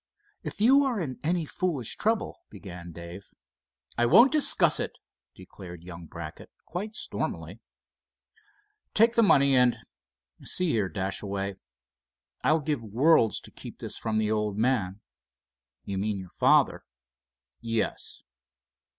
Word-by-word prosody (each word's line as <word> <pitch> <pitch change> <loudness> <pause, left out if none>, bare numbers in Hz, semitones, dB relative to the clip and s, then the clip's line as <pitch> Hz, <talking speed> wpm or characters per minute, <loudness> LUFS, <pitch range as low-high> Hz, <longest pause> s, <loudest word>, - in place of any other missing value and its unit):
"If - - -7
you 265 +6 +6
are 255 -6 0
in 140 -8 -4
any 170 +1 0
foolish 150 -7 -2
trouble——" 225 0 -1
began 90 -4 -10
Dave. 85 +3 -10 0.7
"I 120 - +4
won't 235 - +7
discuss 305 -2 +4
it," - - -2 0.4
declared 90 -3 -11
young 85 -2 -10
Brackett, 80 -1 -9 0.2
quite 210 +5 -5
stormily. - - -4 1.4
"Take 230 +2 +5
the 235 - +4
money, 140 -10 +5
and—see 120 - -1
here, 105 -5 0
Dashaway, 95 0 -3 0.9
I'll 155 +1 +3
give 145 -5 -2
worlds 115 +2 +3
to - - -14
keep - - -10
this - - -7
from 110 -1 -2
the 110 0 +1
old 105 -2 -1
man." 110 -5 0 0.8
"You 95 -1 -3
mean 105 0 -1
your 95 -2 -9
father?" - - +3 0.8
"Yes." 115 -1 -3
110 Hz, 125 wpm, -27 LUFS, -, 1.4 s, won't